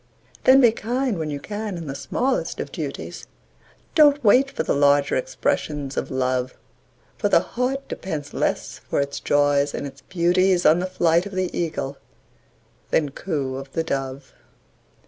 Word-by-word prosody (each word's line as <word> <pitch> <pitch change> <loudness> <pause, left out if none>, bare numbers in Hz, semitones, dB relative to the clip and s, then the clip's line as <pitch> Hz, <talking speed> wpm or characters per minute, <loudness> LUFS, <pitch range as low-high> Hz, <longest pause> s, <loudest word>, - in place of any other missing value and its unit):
Then 265 +1 +7
be 240 -3 +6
kind 240 -1 -2
when 155 -1 -2
you 145 -1 -4
can 205 +3 -5
in 165 - -6
the 135 - -4
smallest 195 - -1
of - - -4
duties, - - -6 0.7
Don't 290 -3 +5
wait 255 +6 +5
for 275 - -3
the - - 0
larger 145 0 +3
expressions 140 +2 -2
of - - -2
Love; 130 -1 -1 0.6
For - - +1
the - - +6
heart 260 +3 -2
depends 150 -6 -5
less - - -2
for - - -2
its 140 0 -2
joys 145 0 +2
and - - -4
its 135 -1 -9
beauties 180 +1 +2
On 155 +3 +6
the 185 - -1
flight 170 0 +2
of 200 - -10
the 185 -1 -2
Eagle 150 -5 -3 0.9
than 150 -3 +1
coo 140 -5 -3
of 135 0 -9
the 165 - 0
Dove. 135 -3 -4
160 Hz, 165 wpm, -23 LUFS, 140-200 Hz, 0.9 s, Then